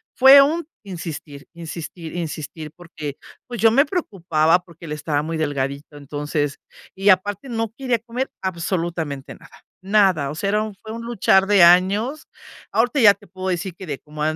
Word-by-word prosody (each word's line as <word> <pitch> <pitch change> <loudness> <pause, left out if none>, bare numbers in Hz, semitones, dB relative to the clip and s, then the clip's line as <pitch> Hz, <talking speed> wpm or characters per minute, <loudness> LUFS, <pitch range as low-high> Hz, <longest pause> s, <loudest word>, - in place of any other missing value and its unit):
Fue 270 +2 +9
un 315 +4 +1 0.2
insistir, 165 -6 -8
insistir, 165 0 -8
insistir 155 -2 -6
porque, 155 -5 -8 0.3
pues, 240 -2 -6
yo 225 0 +6
me 275 +6 +4
preocupaba 175 - +1
porque 170 -1 -15
él 155 - -8
estaba 150 -1 -1
muy 160 +1 -3
delgadito, 145 0 -3
entonces, 145 +1 -3 0.4
y 195 +2 +2
aparte 205 +5 +2
no 225 -2 -2
quería 250 -4 0
comer 240 +4 -4
absolutamente 170 -5 -3
nada, - - -18 0.3
nada. 190 -8 +3
O - - -7
sea, 195 +5 -2
era 210 +1 +1
un 215 -2 -7
fue 220 +3 -11
un 230 +1 -6
luchar 195 -4 +3
de 200 -3 +6
años. 195 - +4 0.4
Ahorita 245 +5 +1
ya 210 -5 +8
te - - -20
puedo 185 0 -5
decir 180 0 -3
que 190 - -9
de 145 -5 -5
como 150 0 -10
180 Hz, 170 wpm, -21 LUFS, 155-215 Hz, 0.4 s, Fue